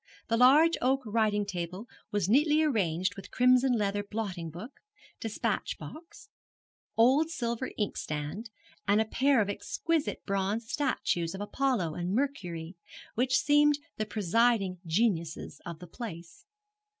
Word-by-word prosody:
The 230 Hz, -, +3 dB
large 295 Hz, +7 st, +6 dB
oak 265 Hz, +2 st, +2 dB
writing 210 Hz, -1 st, +1 dB
table 180 Hz, +1 st, -5 dB, 0.2 s
was 205 Hz, -4 st, 0 dB
neatly 300 Hz, +7 st, +4 dB
arranged 185 Hz, -, 0 dB
with 195 Hz, -, -10 dB
crimson 255 Hz, +1 st, +4 dB
leather 205 Hz, -3 st, 0 dB
blotting 200 Hz, -5 st, -4 dB
book, 195 Hz, -, -10 dB, 0.4 s
despatch 225 Hz, -2 st, -2 dB
box, 340 Hz, +6 st, -11 dB, 0.7 s
old 265 Hz, +8 st, +5 dB
silver 235 Hz, -4 st, -2 dB
inkstand, 200 Hz, +1 st, -3 dB, 0.4 s
and 205 Hz, +2 st, +4 dB
a 220 Hz, -, +2 dB
pair 265 Hz, +2 st, +3 dB
of 205 Hz, -, 0 dB
exquisite 315 Hz, +9 st, -2 dB
bronze 200 Hz, +3 st, -1 dB
statuettes 195 Hz, -, -1 dB
of 195 Hz, -, -6 dB
Apollo 205 Hz, -, 0 dB
and 175 Hz, +4 st, -2 dB
Mercury, 180 Hz, -11 st, -3 dB, 0.4 s
which 255 Hz, +2 st, +2 dB
seemed 295 Hz, 0 st, +4 dB, 0.2 s
the 215 Hz, -, -2 dB
presiding 210 Hz, -2 st, +1 dB
geniuses 170 Hz, -3 st, -1 dB
of 170 Hz, -2 st, -6 dB
the 180 Hz, -, -10 dB
place. 170 Hz, -4 st, -9 dB
220 Hz, 130 wpm, -29 LUFS, 185-260 Hz, 0.7 s, large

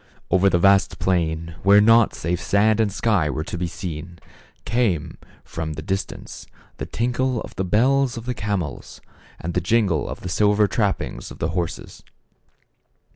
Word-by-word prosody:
Over 95 Hz, +1 st, +4 dB
the 85 Hz, -, +2 dB
vast 100 Hz, +2 st, +3 dB
plain, 85 Hz, -2 st, -1 dB
where 100 Hz, +1 st, +6 dB
naught 115 Hz, +1 st, +5 dB
save 85 Hz, +2 st, -2 dB
sand 110 Hz, +2 st, +2 dB
and 110 Hz, -3 st, +2 dB
sky 100 Hz, -6 st, +1 dB
were 75 Hz, +2 st, -2 dB
to 80 Hz, -, -6 dB
be 85 Hz, 0 st, -2 dB
seen, 85 Hz, 0 st, -7 dB, 0.5 s
came, 100 Hz, -9 st, -1 dB, 0.2 s
from 80 Hz, -1 st, -5 dB
the 75 Hz, +1 st, -7 dB
distance, 95 Hz, +3 st, -5 dB, 0.3 s
the -, -, -5 dB
tinkle 125 Hz, +1 st, -1 dB
of -, -, -10 dB
the 95 Hz, -, -1 dB
bells 125 Hz, +7 st, +2 dB
of 115 Hz, -, -7 dB
the 125 Hz, -, -2 dB
camels, 100 Hz, -, -4 dB, 0.4 s
and 85 Hz, +1 st, -4 dB
the 90 Hz, -, 0 dB
jingle 110 Hz, +3 st, +1 dB
of -, -, -7 dB
the 90 Hz, -, -5 dB
silver 105 Hz, +3 st, +3 dB
trap 100 Hz, 0 st, +1 dB
pings -, -, -7 dB
of -, -, -11 dB
the 80 Hz, -, -2 dB
.horses. 85 Hz, 0 st, -4 dB
95 Hz, 170 wpm, -22 LUFS, 85-110 Hz, 0.5 s, where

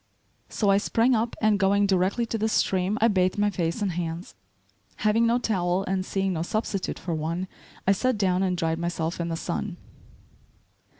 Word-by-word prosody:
So 205 Hz, -3 st, +1 dB
I 195 Hz, -, +4 dB
sprang 230 Hz, +4 st, +2 dB
up 230 Hz, 0 st, 0 dB
and 215 Hz, -2 st, +4 dB
going 200 Hz, +1 st, +3 dB
directly 195 Hz, +4 st, +1 dB
to 225 Hz, -, -3 dB
the 220 Hz, +1 st, +1 dB
stream 190 Hz, 0 st, +1 dB
I 230 Hz, -, +5 dB
bathed 185 Hz, -2 st, +1 dB
my 205 Hz, 0 st, +2 dB
face 170 Hz, +3 st, -2 dB
and 195 Hz, -, 0 dB
hands. 170 Hz, 0 st, -4 dB, 0.7 s
Having 225 Hz, +2 st, +4 dB
no 235 Hz, +1 st, +3 dB
towel 185 Hz, -5 st, 0 dB
and 190 Hz, -1 st, -1 dB
seeing 195 Hz, 0 st, -1 dB
no 160 Hz, -, -2 dB
substitute 195 Hz, +1 st, -2 dB
for 175 Hz, -, -4 dB
one, 165 Hz, +4 st, -2 dB, 0.4 s
I 195 Hz, -, +4 dB
sat 250 Hz, +4 st, +1 dB
down 185 Hz, -2 st, +1 dB
and 185 Hz, -2 st, 0 dB
dried 165 Hz, -1 st, -1 dB
myself 170 Hz, 0 st, -2 dB
in 170 Hz, -, -1 dB
the 165 Hz, -, -2 dB
sun. 175 Hz, +3 st, -4 dB
190 Hz, 185 wpm, -26 LUFS, 175-210 Hz, 0.7 s, I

